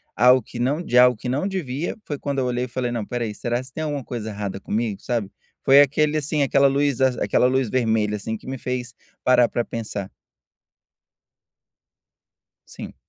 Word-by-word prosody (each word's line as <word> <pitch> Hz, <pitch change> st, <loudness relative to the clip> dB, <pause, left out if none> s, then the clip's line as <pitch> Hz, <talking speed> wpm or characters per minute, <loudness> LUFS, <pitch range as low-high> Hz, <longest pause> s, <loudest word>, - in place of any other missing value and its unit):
algo 125 Hz, +3 st, +6 dB
que 120 Hz, +2 st, -10 dB
não 140 Hz, +7 st, 0 dB
de 125 Hz, -, 0 dB
algo 125 Hz, -2 st, +6 dB
que 125 Hz, -, -7 dB
não 140 Hz, +9 st, 0 dB
devia, 170 Hz, -, -3 dB
foi 145 Hz, -, -4 dB
quando 140 Hz, -1 st, -3 dB
eu 130 Hz, -, 0 dB
olhei 125 Hz, 0 st, -1 dB
e -, -, -8 dB
falei: 120 Hz, 0 st, -3 dB
"Não, 120 Hz, -2 st, -2 dB
espera 120 Hz, +3 st, -3 dB
aí, 105 Hz, -, -4 dB
será 120 Hz, +3 st, -2 dB
se 130 Hz, 0 st, -15 dB
tem 155 Hz, -, -4 dB
alguma 145 Hz, -3 st, -3 dB
coisa 115 Hz, -3 st, -5 dB
errada 100 Hz, -2 st, -5 dB
comigo?" 105 Hz, -1 st, -2 dB
sabe, 115 Hz, -5 st, -2 dB, 0.4 s
foi 140 Hz, +1 st, +8 dB
aquele, 150 Hz, +2 st, +2 dB
assim, 150 Hz, 0 st, 0 dB
aquela 140 Hz, +1 st, +4 dB
luz 140 Hz, -1 st, +1 dB
aquela 125 Hz, -2 st, +2 dB
luz 130 Hz, -2 st, +1 dB
vermelha, 110 Hz, -4 st, +1 dB
assim, 110 Hz, +2 st, -4 dB
que -, -, -16 dB
me 130 Hz, 0 st, -4 dB
fez 125 Hz, 0 st, -4 dB, 0.3 s
parar 125 Hz, -2 st, +4 dB
pra 120 Hz, -, -1 dB
pensar. 105 Hz, -4 st, -5 dB, 2.6 s
Sim. -, -, -9 dB
125 Hz, 190 wpm, -23 LUFS, 115-140 Hz, 2.6 s, foi